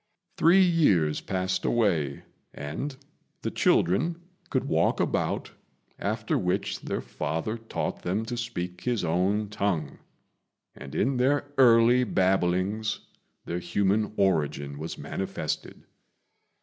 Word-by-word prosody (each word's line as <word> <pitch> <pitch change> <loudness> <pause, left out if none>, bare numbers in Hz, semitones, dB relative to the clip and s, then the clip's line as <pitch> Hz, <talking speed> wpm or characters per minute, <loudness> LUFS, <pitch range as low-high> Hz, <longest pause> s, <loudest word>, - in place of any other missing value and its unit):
Three 185 +4 +6
years 100 - +3
passed 95 0 -1
away, 85 - +1 0.3
and 130 - -5 0.5
the - - -1
children 160 - +2 0.3
could - - 0
walk - - +1
about, - - -1 0.5
after - - -1
which 90 0 -1
their - - -3
father 80 +8 -3
taught 115 -1 -4
them 100 +5 -1
to 120 - -4
speak 90 -7 -4
his 120 -5 -1
own 95 +5 +1
tongue; 95 -9 -2 0.7
and 70 - -10
in 130 +3 +1
their 145 +3 +1
early 120 0 +6
babblings 95 +1 +1 0.4
their 85 - -3
human 100 +4 +1
origin 75 -7 0
was 80 +2 -5
manifested. - - -4
100 Hz, 110 wpm, -27 LUFS, 85-120 Hz, 0.7 s, Three